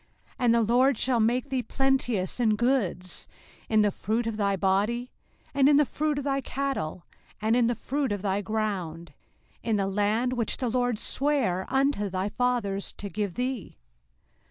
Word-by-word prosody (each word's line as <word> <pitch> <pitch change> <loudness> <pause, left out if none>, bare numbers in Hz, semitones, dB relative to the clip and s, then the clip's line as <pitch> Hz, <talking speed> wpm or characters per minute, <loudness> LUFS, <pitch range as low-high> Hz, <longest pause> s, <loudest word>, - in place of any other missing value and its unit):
05:028:011 - - -28
And 235 -1 +5
the 235 - +4
LORD 245 +3 +3
shall 245 0 +1
make 240 +5 +1
thee 260 -1 0
plenteous 245 -6 0
in 220 -3 +3
goods, 210 -7 -1 0.4
in 215 -1 +4
the 205 - +2
fruit 220 +5 -1
of 225 -1 -2
thy 200 -2 +1
body, 205 +6 0 0.4
and 275 0 +5
in 290 - +6
the 295 - +5
fruit 300 +2 -1
of 285 - -2
thy 275 -1 0
cattle, 270 - -3 0.3
and 220 +2 +2
in 240 -1 +3
the 240 - 0
fruit 275 +2 -2
of 205 -1 -3
thy 200 0 0
ground, 185 -7 -3 0.5
in 225 -1 0
the 200 -1 +1
land 210 +5 +1
which 235 -4 -1
the 250 - -1
LORD 245 -1 +1
sware 240 -9 0
unto 270 -7 +1
thy 190 +2 -2
fathers 230 -5 -1
to 200 - -7
give 205 -3 -3
thee. 250 -3 -3
230 Hz, 180 wpm, -27 LUFS, 200-255 Hz, 0.5 s, in